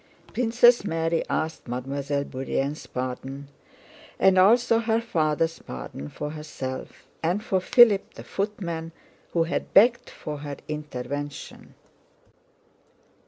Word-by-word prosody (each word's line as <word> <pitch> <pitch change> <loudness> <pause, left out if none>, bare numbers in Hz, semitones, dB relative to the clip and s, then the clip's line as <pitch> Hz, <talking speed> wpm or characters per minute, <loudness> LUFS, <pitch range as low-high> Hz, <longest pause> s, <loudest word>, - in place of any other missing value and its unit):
Princess 240 0 +5
Mary 165 -3 0
asked 160 -3 -2
Mademoiselle 140 +3 -2
Bourienne's 135 +2 -3
pardon, 135 +2 -5 0.7
and 190 0 +5
also 230 +4 +5
her 225 0 +1
father's 165 -7 0
pardon 65 +3 -7
for 150 - -5
herself 150 -4 -7 0.2
and 180 +6 0
for 190 - +1
Philip 210 +1 +5
the - - -9
footman, 170 -5 -4 0.4
who 170 - +3
had 165 - -3
begged 235 +4 +5
for 150 -1 -7
her 145 -1 -6
intervention. 145 -1 -6
160 Hz, 110 wpm, -26 LUFS, 140-200 Hz, 0.7 s, Princess